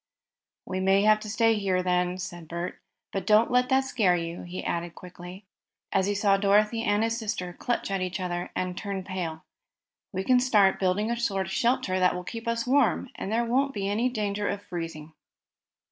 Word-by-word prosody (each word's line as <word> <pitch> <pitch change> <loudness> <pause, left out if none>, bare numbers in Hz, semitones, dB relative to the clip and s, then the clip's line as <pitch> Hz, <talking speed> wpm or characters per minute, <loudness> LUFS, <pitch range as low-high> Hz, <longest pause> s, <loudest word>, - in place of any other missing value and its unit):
"We 185 0 -3
may 195 +1 +3
have 215 0 +5
to 215 0 -7
stay 225 +2 +3
here," 180 -2 +1
said 175 -3 -7
Bert. 170 +2 -5 0.3
"But 195 - -3
don't 215 +3 +5
let 250 0 +3
that 265 0 +4
scare 215 -9 +2
you," 170 0 -4
he 175 +1 -6
said 170 0 -3
quickly, 180 +2 -11 0.5
as 195 0 +2
he 205 - 0
saw 200 -1 +3
Dorothy 210 +3 +3
and 210 -1 +1
his 225 0 0
sister 195 -5 -3
clutch 240 +1 -2
at 195 -1 -1
each 185 +1 -3
other 175 -1 -3
and 180 -1 -2
turn 195 -1 -4
pale. 175 -4 -5 0.7
"We 190 - -2
can 250 +4 +4 0.4
build 185 -1 +2
a 225 +3 0
sort 195 -5 0
of 180 - -7
shelter 210 -4 +1
that 180 -1 +3
will 180 - -5
keep 230 +5 -7
us 230 0 0
warm, 265 -1 +2
and 195 - -5
there 235 +2 +1
won't 270 +3 +1
be 195 -1 -2
any 220 +5 +1
danger 210 -3 -2
of 200 0 -4
freezing." 165 -4 -6
195 Hz, 190 wpm, -27 LUFS, 180-225 Hz, 0.7 s, have